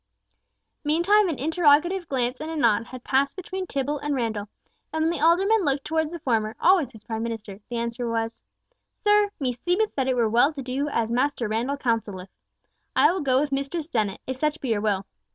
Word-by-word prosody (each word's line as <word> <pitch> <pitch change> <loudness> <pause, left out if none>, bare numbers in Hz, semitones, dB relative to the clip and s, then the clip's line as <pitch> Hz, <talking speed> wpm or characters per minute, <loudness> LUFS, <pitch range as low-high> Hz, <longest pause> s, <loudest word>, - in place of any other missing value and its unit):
Meantime 345 +7 +3
an 310 - -2
interrogative 325 +4 +3
glance 250 -1 -1
and 310 - -4
a 325 - -4
nod 230 -5 +2
had 255 -1 -10
passed 275 +1 +1
between 375 0 -5
Tibble 280 +1 -2
and 290 0 -2
Randall, 220 -5 -2 0.4
and 315 0 0
when 325 - +2
the 330 -4 -3
alderman 385 +6 +4
looked 275 -2 0
towards 315 0 0
the 340 - -5
former, 225 -7 -1
always 350 -9 +4
his 220 -4 -14
prime 225 0 -4
minister, 220 -4 -5
the 240 - -3
answer 235 +1 -3
was, 225 0 -2 0.5
"Sir, 415 0 +3
meseemeth 350 - 0
that 265 -2 -1
it 260 - +2
were 235 -2 +2
well 240 +8 +3
to 275 -2 -6
do 265 +4 -2
as 230 -5 -1
Master 250 -1 0
Randall 235 +6 -1
counselleth. 220 -7 -2 0.7
I - - +5
will 370 0 -2
go 260 -2 +3
with 290 0 -1
Mistress 280 +4 -2
Dennet, 210 -7 -1
if 260 0 -4
such 305 +2 0
be 265 - -4
your 215 -2 +1
will. 200 -3 0
275 Hz, 200 wpm, -25 LUFS, 230-320 Hz, 0.7 s, I